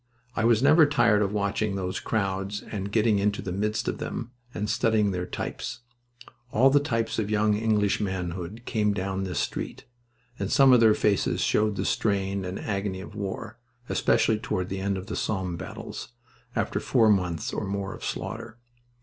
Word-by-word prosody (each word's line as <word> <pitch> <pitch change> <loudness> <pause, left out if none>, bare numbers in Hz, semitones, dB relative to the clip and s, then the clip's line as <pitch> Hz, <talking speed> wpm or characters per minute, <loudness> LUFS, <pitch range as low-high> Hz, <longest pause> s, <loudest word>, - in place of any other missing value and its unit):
I 110 - +1
was 115 +1 +4
never 155 +1 +7
tired 115 -7 +3
of 100 -1 +1
watching 100 0 0
those 95 -1 -2
crowds 100 -1 -2
and 100 -1 -5
getting 110 -1 +3
into 105 +1 +1
the 90 - -4
midst 105 +3 -1
of - - -2
them, 120 0 -4 0.2
and 105 -3 -3
studying 110 -1 +2
their 90 -1 -3
types. 120 - -5 0.7
All 130 +5 +5
the 145 - +6
types 115 -6 -1
of 105 -2 -1
young 105 0 +2
English 105 -2 +1
manhood 95 +2 -4
came 105 -2 +1
down 95 0 -2
this 90 -4 -4
street, - - -3 0.5
and - - -2
some 135 -1 +7
of 125 - +7
their 110 -2 +6
faces 100 -2 +1
showed 105 -1 +2
the - - -2
strain 100 -2 0
and 90 +1 -4
agony 100 -2 -2
of 95 - -9
war, 105 +2 -5 0.3
especially 110 -1 +2
toward 90 -3 -2
the 95 - -3
end 100 0 0
of 95 - -6
the - - -5
Somme 95 -4 -2
battles, - - -7 0.5
after - - 0
four 110 -3 +4
months 90 -5 0
or - - -2
more 100 0 -3
of - - -10
slaughter. 110 +1 -5
105 Hz, 180 wpm, -27 LUFS, 95-110 Hz, 0.7 s, never